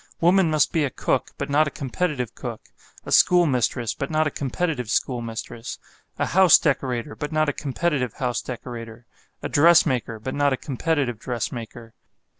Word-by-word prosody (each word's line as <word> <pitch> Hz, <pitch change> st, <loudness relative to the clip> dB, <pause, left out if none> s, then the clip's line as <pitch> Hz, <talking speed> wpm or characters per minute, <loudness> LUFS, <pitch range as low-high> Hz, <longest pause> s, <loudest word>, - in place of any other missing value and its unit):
Woman 175 Hz, +1 st, +4 dB
must 155 Hz, -1 st, +2 dB
be 160 Hz, -, +2 dB
a 140 Hz, -, 0 dB
cook, -, -, -1 dB
but 140 Hz, -, -3 dB
not 150 Hz, +1 st, +3 dB
a -, -, -1 dB
competitive 140 Hz, -, -3 dB
cook; -, -, -8 dB, 0.4 s
a -, -, -7 dB
school 180 Hz, -1 st, +5 dB
mistress, 120 Hz, -4 st, 0 dB
but 140 Hz, -, -4 dB
not 155 Hz, 0 st, +1 dB
a 150 Hz, -, -1 dB
competitive 140 Hz, -3 st, -2 dB
schoolmistress; 115 Hz, -1 st, -3 dB, 0.4 s
a -, -, 0 dB
house 185 Hz, -2 st, +6 dB
decorator 135 Hz, -2 st, -1 dB
but 150 Hz, -1 st, -5 dB
not 155 Hz, -1 st, +2 dB
a -, -, -1 dB
competitive 140 Hz, -4 st, -1 dB
house 125 Hz, -2 st, -2 dB
decorator; 120 Hz, -2 st, -8 dB, 0.4 s
a -, -, -1 dB
dressmaker, 145 Hz, -8 st, +3 dB
but 130 Hz, +5 st, -5 dB
not 145 Hz, -1 st, +2 dB
a -, -, -1 dB
competitive 135 Hz, -4 st, -1 dB
dressmaker. 115 Hz, -1 st, -5 dB
135 Hz, 165 wpm, -23 LUFS, 120-155 Hz, 0.4 s, house